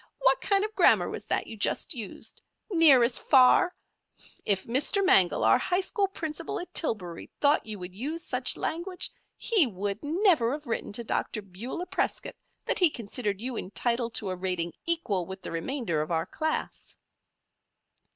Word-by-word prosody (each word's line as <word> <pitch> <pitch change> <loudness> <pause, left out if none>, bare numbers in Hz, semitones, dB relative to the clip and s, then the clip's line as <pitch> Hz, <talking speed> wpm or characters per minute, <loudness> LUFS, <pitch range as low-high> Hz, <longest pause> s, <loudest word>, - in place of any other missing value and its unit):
"What - - +3
kind 400 0 +2
of 435 - -7
grammar - - +4
was - - -7
that - - -1
you - - -8
just 210 - +1
used 225 -7 -6 0.3
'near 315 -8 +7
as 235 +1 +1
far'? 275 +7 +5 0.7
If 195 -2 +3
Mr. 295 - +1
Mangel, 190 - +5
our 255 - +5
high 360 +7 0
school 395 +1 0
principal 325 -3 -5
at 355 - -9
Tillbury, 185 - -1
thought 285 -4 +2
you 215 -1 -2
would 180 -1 -7
use 295 - -4
such - - 0
language 360 +3 -1 0.3
he 410 - +3
would 200 0 -4
never 315 - +2
have 295 +1 -6
written 235 - -3
to 235 - -2
Dr. 215 -1 -2
Beulah 215 - -6
Prescott - - -2 0.3
that - - 0
he 360 -3 +5
considered 210 -5 -4
you 250 +1 -3
entitled 235 +4 -1
to 195 -3 0
a - - -3
rating 180 -2 -2
equal 215 - 0
with 190 0 -9
the - - -6
remainder 170 - -2
of 155 - -4
our 165 -1 0
class." 315 +10 -4
245 Hz, 170 wpm, -28 LUFS, 200-330 Hz, 0.7 s, near